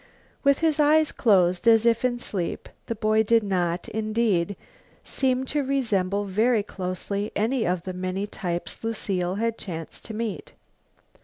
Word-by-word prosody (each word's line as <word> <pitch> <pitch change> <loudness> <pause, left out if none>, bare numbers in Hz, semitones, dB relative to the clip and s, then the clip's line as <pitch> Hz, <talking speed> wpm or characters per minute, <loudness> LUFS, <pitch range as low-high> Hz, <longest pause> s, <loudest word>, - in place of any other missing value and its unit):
With 280 -1 +4
his 310 -1 +2
eyes 305 +1 +4
closed 185 -3 +3
as 225 0 +6
if 230 0 +3
in 245 -1 +1
sleep, 190 -7 -3 0.2
the 230 - -2
boy 215 0 +2
did 225 +1 +3
not, 180 -3 -1
indeed, 215 -4 0 0.5
seem 260 -1 +1
to 290 +2 -1
resemble 205 -8 0
very 215 +3 +2
closely 200 +2 -4
any 225 +2 +1
of 180 -1 -1
the 185 - -5
many 185 +2 -3
types 175 -3 -5
Lucile 190 -5 -1
had 230 +2 -1
chanced 165 -4 -7
to 220 - -6
meet. 220 -2 -4
215 Hz, 150 wpm, -25 LUFS, 185-235 Hz, 0.5 s, as